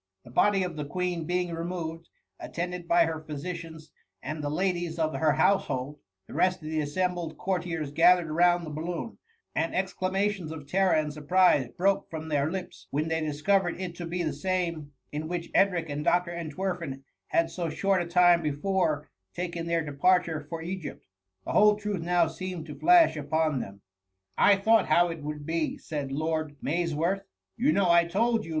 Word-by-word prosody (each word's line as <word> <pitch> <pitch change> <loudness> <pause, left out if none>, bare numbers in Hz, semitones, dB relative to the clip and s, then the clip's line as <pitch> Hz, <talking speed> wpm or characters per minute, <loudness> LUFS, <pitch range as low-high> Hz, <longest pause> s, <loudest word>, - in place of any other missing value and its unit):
The 120 - -13
body 200 +7 +3
of 175 -3 -5
the 150 - -2
Queen 175 +1 -2
being 180 -1 -1
removed, 165 -1 -5 0.3
at« - - -9
tended 175 0 -3
by 170 0 +5
her 160 -1 -3
physicians 160 0 -7 0.3
and 155 0 -4
die 145 - -2
ladies 175 +1 -1
of 155 -1 0
her 155 -2 +2
household, 145 -7 +1 0.3
the - - -12
rest 185 0 +2
of 155 - -5
the 160 0 -1
assembled 175 +2 -2
cour* 190 -1 0
tiers 165 -5 -4
gathered 170 +1 +4
round 175 +1 +3
the 155 - -7
balloon; 170 +8 -5 0.3
and 165 +2 -1
exclama^ 185 +1 0
tioBs 195 -6 -2
of 160 -3 -7
terror 185 +4 +2
and 155 -1 0
surprise 150 -2 +3
broke 195 +2 +1
from 160 0 -6
their 145 0 +1
lips 185 0 -7
when 155 +3 -1
they 160 0 0
discovered 170 +5 +1
it 185 -2 -4
to 175 - -5
be 175 +1 -2
the 155 -3 -1
same 170 -2 -2 0.2
in 150 +1 -4
which 175 0 -4
Edric 180 -4 +3
and 145 0 -4
Dr. 175 +1 +2
Entwerfen 170 -3 -4 0.2
had 165 0 +1
so 170 -1 -3
short 195 +3 +1
a 175 - -4
time 175 0 +5
befcure 155 0 0 0.3
taken 170 -1 -4
their 165 -1 0
departure 160 +1 +1
for 165 -1 -5
Egypt. 175 -2 -6 0.4
The - - -3
whole 210 0 +6
truth 205 -3 -3
now 175 0 +3
seemed 180 0 -5
to 150 -2 -9
flash 345 - +6
upon 155 -1 0
them. 100 - -6 0.6
*^ - - +2
I 205 - +7
thought 220 +3 +3
how 175 +3 +4
it 165 -2 -6
would 150 0 -6
be,^ 160 0 -1
said 145 -3 -5
Lord 155 +1 -2
Maysworth; 170 +5 0 0.3
you 270 +6 +2
know 195 - +3
I 170 0 +5
told 225 +6 +1
you. - - -9
170 Hz, 185 wpm, -28 LUFS, 155-180 Hz, 0.6 s, I